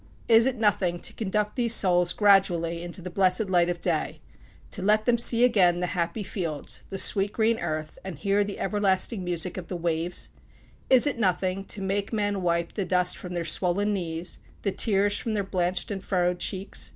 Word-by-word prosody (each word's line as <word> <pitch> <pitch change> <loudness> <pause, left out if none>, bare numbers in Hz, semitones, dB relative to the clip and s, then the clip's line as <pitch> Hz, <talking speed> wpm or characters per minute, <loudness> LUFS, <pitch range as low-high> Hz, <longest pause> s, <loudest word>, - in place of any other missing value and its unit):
Is 230 +1 +6
it 260 -1 -2
nothing 195 -5 +1
to - - -2
conduct 210 0 -2
these 235 -3 +3
souls 180 -2 +3
gradually 180 -5 +2
into 175 +1 -4
the 180 - -7
blessed 190 +2 +2
light 175 -1 +3
of 175 -1 -3
day - - -2 0.5
to 195 - -3
let 215 +2 +2
them 235 -1 +2
see 235 0 +4
again 185 -8 +3
the 180 - -1
happy 180 +4 -2
fields, 170 -6 -4
the 195 - -5
sweet, 195 +1 +3
green 225 0 +1
earth, 155 0 -5
and 190 -5 -7
hear 200 +5 +1
the 200 0 -7
everlasting 200 0 0
music 175 0 -1
of 180 -2 -7
the 180 - -5
waves? 170 +1 -2 0.6
Is 260 0 +7
it 285 -5 -2
nothing 190 -1 0
to 200 - -5
make 200 +1 -2
men 205 -3 -1
wipe 170 -1 -1
the 205 - -2
dust 180 0 +1
from 180 -1 -8
their 170 -1 -3
swollen 185 +5 +1
knees, 170 -2 -3 0.2
the 200 - 0
tears 205 0 +1
from 225 -2 -3
their 205 - -1
blanched 185 0 -2
and 195 -2 -5
furrowed 180 -1 0
cheeks? 195 0 -2
190 Hz, 195 wpm, -26 LUFS, 175-205 Hz, 0.6 s, Is